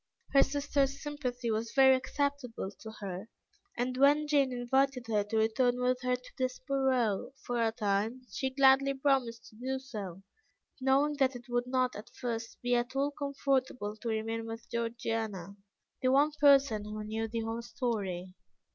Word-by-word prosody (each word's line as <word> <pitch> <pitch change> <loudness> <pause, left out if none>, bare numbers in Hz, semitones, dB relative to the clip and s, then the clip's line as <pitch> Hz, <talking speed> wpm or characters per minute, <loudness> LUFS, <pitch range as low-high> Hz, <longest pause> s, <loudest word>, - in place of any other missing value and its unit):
Her 275 - +7
sisters' 280 -1 +1
sympathy 255 -5 -3
was 220 +1 -2
very 265 -1 +7
acceptable 260 -5 -2
to 220 - -8
her, 195 +2 -5 0.5
and 250 +1 -1
when 290 +3 +5
Jane 280 -3 +3
invited 255 +1 +1
her 215 -2 +1
to 220 +2 -2
return 245 +3 +2
with 250 0 +1
her 250 0 +1
to 250 0 -12
Desborough 255 -3 0
for 245 -1 -1
a 225 -1 +2
time, 220 +2 -1
she 265 - -1
gladly 275 +1 +4
promised 265 -4 +1
to - - -20
do 260 +3 -2
so, 205 -9 -7 0.6
knowing 275 +3 +2
that 265 -2 +2
it 245 +1 -9
would 245 0 0
not 255 0 +1
at 210 +3 -9
first 230 -2 -4
be 245 0 +1
at 240 +2 0
all 280 +1 +1
comfortable 270 -6 -1
to 230 +2 -4
remain 225 +1 -2
with 225 +1 -8
Georgiana, 225 -5 -3 0.5
the 255 -1 +3
one 285 +3 +4
person 280 -7 +4
who 210 0 -6
knew 220 +1 -2
the 225 +1 -3
whole 225 +1 -3
story. 200 -7 -3
250 Hz, 165 wpm, -31 LUFS, 225-270 Hz, 0.6 s, Her